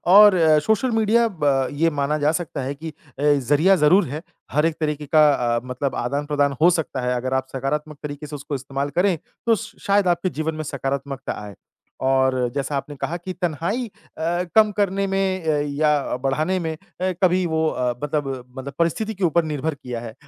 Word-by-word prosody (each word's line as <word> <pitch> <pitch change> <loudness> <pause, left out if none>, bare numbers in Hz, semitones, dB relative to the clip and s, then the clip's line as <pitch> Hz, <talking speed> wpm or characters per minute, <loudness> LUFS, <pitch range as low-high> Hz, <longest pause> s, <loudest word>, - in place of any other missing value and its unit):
और 205 -2 +9 0.3
social 220 +4 +2
media 225 +2 +3 0.2
ब 135 -2 +3
ये 165 - +5
माना 150 +2 +1
जा 150 - +5
सकता 150 -4 -5
है 135 +2 -3
कि 160 +3 -7
अ, 150 -3 -14
ज़रिया 145 +6 +4
ज़रूर 185 +4 +5
है। 150 +5 -5 0.3
हर 150 +3 +2
एक 165 -1 +1
तरीके 150 -2 -2
का 150 0 +5 0.3
अ, - - +1
मतलब 130 +2 -3
आदान-प्रदान 140 +2 0
हो 175 - +7
सकता 140 -4 -3
है। 125 - +1
अगर 130 +2 -2
आप 130 0 0
सकारात्मक 150 +3 -3
तरीके 145 0 -6
से 150 - -7
उसको 145 0 -5
इस्तेमाल 135 +2 -3
करें 185 -3 +3 0.3
तो 230 -1 +4
श - - -8
शायद 200 -1 +3
आपके 175 +1 +1
जीवन 155 -1 -3
में 155 - -4
सकारात्मकता 140 -1 -3
आए। 105 -2 -9 0.5
और 130 -1 +3 0.2
जैसा 140 +1 -2
आपने 145 +1 -4
कहा 160 +5 -3
कि 185 +2 -6
तनहाई 180 - -2 0.3
अ, 175 +2 0
कम 215 -1 +6
करने 200 -1 0
में 190 -2 0
अ, 155 -2 +2 0.2
या 150 -4 +2
बढ़ाने 155 +7 +1
में 160 - -1
अ, - - -18 0.5
कभी 180 0 +3
वो 160 -1 0
अ, 125 -1 -1
मतलब 135 -4 -2
मतलब 140 +2 -6
परिस्थिति 210 +7 0
के 195 -2 -6
ऊपर 170 0 +3
निर्भर 155 0 -2
किया 125 -4 -6
है 115 -2 -7
150 Hz, 195 wpm, -22 LUFS, 140-175 Hz, 0.5 s, और